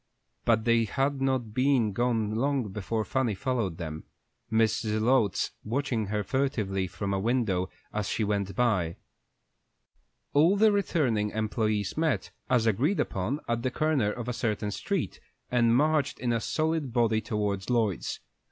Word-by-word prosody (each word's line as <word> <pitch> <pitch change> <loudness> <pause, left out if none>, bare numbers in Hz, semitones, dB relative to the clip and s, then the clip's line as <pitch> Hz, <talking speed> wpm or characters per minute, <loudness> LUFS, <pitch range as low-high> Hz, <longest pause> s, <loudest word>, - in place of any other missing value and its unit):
But 110 -1 +3
they 115 -1 +4
had 135 +5 -1
not 130 -5 0
been 130 -4 +2
gone 115 -1 0
long 130 -1 0
before 105 +2 -2
Fanny 130 -6 0
followed 115 -7 -1
them, 80 -2 -6 0.5
Mrs. 110 -1 +2
Zelotes 110 -3 +2
watching 120 -2 -1
her 105 +1 -1
furtively 105 -6 -1
from 100 +3 -3
a 95 - 0
window 105 -5 0 0.2
as 105 -1 -2
she 110 - 0
went 100 -2 -1
by. 95 -9 +1 1.4
All 165 +7 +5
the 215 +1 +5
returning 135 - +1
employés 110 -2 -1
met, 160 -1 0 0.2
as 125 -3 +3
agreed 130 - +2
upon, 105 +11 -1
at 115 0 0
the 130 - 0
corner 140 -6 +1
of 120 +1 -6
a 125 - -1
certain 105 -3 -1
street, - - -2 0.3
and 120 -2 +4
marched 150 +1 +2
in 120 -1 -1
a 115 - +1
solid 155 -2 -1
body 115 -2 +2
towards 105 -4 -2
Lloyd's. 110 - 0
115 Hz, 150 wpm, -28 LUFS, 105-130 Hz, 1.4 s, All